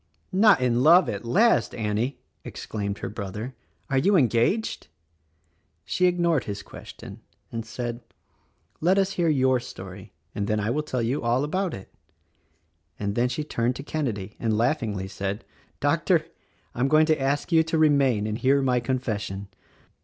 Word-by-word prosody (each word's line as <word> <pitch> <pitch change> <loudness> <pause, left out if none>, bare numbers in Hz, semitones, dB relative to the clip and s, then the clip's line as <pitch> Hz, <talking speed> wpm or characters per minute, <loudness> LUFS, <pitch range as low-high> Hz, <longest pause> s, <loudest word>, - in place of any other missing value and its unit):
"Not 200 -6 +5
in 125 -1 +2
love, 170 +6 +6
at 100 +3 -4
last, 220 - +3
Annie!" 110 +4 -1 0.3
exclaimed 100 -2 -5
her - - -5
brother. 105 +4 -6 0.3
"Are 135 -3 +1
you 195 +8 +3
engaged?" 135 - +1 1.0
She 180 - +2
ignored 170 -4 +1
his 100 -1 -5
question - - -11 0.3
and 115 -1 -4
said, 120 +1 -5 0.8
"Let 180 +4 +3
us 195 0 +2
hear 175 -3 +1
your 130 -3 +3
story 95 -3 -10 0.2
and 100 0 -2
then 110 0 +1
I 105 +2 -1
will 150 - 0
tell 130 -5 -2
you 125 +6 -1
all 120 +3 +1
about 185 +4 -1
it." 95 - -12 1.1
And 100 -1 -2
then 120 +3 +1
she 140 +5 -3
turned 120 -4 -1
to 140 - -7
Kenedy 115 -11 -3
and 110 -2 0
laughingly 110 -6 0
said, 100 +1 -4 0.3
"Doctor, - - +2 0.5
I - - -8
am 130 - +3
going 155 +2 +5
to 155 -2 +1
ask 145 +5 -1
you 165 -1 +6
to 160 0 -1
remain 140 -8 +3
and 110 +1 -3
hear 140 +1 +3
my 125 -2 +2
confession." 110 -6 -3
125 Hz, 160 wpm, -25 LUFS, 110-155 Hz, 1.1 s, love